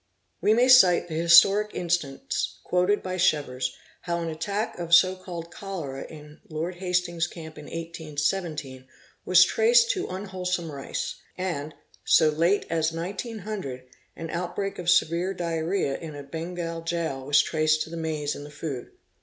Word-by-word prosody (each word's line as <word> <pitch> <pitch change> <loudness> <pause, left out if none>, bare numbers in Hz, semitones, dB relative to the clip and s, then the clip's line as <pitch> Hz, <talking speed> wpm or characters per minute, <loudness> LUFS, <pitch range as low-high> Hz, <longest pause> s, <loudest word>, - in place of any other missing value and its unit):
We 210 +5 +4
may 245 +2 +4
cite 185 -9 +6
the - - -5
historic 170 +6 +5
instance 170 -6 -2
quoted 180 +3 +1
by 185 0 -3
Chevers 130 -7 0 0.2
how 170 -1 -2
an 165 - -3
attack 200 +7 -3
of 170 0 +4 0.3
called 170 -2 -7
cholera 165 -9 -6
in 150 0 -13
Lord 165 +3 -4
Hastings' 180 -2 0
camp 160 -3 -10
in 150 - -10
1817 155 -4 -4 0.4
was 180 0 +7
traced 470 - +4
to 380 -6 -3
unwhole 185 -1 -3
me 165 -3 -7
rice; 140 -1 -4 0.2
and, 155 -5 -3 0.3
so 155 - +5
late 170 +6 +2
as 160 -1 0
1900, 190 - -5 0.3
an 165 -1 -6
out 175 +1 -4
break 195 -1 -3
of 175 -1 -1
severe 175 +2 +2
diarrhcea 165 -3 -1
in 160 -3 -8
a 145 - -7
sngal 165 +2 -5
jail 165 -5 -2
was 145 +2 +4
traced 155 -1 +1
to 160 - -11
the - - -5
maize 155 -3 -2
in 145 - -8
the 145 - -10
food. 145 -3 -6
170 Hz, 155 wpm, -26 LUFS, 155-185 Hz, 0.4 s, was